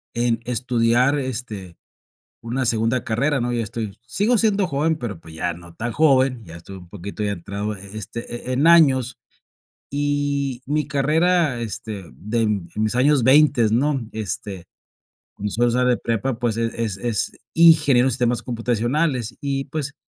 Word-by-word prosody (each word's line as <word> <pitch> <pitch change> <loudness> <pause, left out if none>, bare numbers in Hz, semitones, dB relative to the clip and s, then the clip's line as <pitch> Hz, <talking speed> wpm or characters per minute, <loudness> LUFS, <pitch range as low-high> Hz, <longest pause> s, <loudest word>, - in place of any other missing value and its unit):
en 120 -1 0
estudiar, 125 +2 +2
este, 110 -9 -5 0.7
una 125 +3 -2
segunda 115 +2 +1
carrera, 135 +5 0
¿no? 120 +1 -1
Ya 120 - 0
estoy 110 -2 -5
sigo 210 - +1
siendo 205 -3 +2
joven, 155 +1 0
pero, 115 - -5
pues, 80 -1 -14
ya 85 +2 -2
no 85 0 -14
tan 120 +6 -4
joven, 130 -3 +3
ya 80 -1 -10
estoy 95 +3 -11
un 90 -2 -13
poquito 100 +2 -7
ya 100 - 0
entrado, 100 +3 -4
eh 95 - -11
eh, 100 - -10
este, 115 +3 -6
eh, - - 0
en 135 +5 +2
años. 135 -7 +5 0.7
Y 145 -2 -1
mi 150 +1 0
carrera, 155 0 +2
este, 105 -2 -5
den 105 -3 -1
en 105 - 0
mis 110 +1 0
años 135 +1 +3
veintes, 130 -4 +5
¿no? 135 +4 +1
Este, 100 -3 -5 0.7
cuando 105 +1 -4
solo 120 +4 +2
sale 125 +1 +2
de 125 - +3
prepa, 115 +2 -2
pues, 115 -2 -1
eh, 115 0 0
es 110 -4 -2
es 115 -1 -1 0.2
ingeniero 150 -6 +6
de - - +1
sistemas 120 -1 0
computacionales, 120 +2 -1
y, 135 -1 -2
pues, 145 0 -5
120 Hz, 165 wpm, -22 LUFS, 110-140 Hz, 0.7 s, ingeniero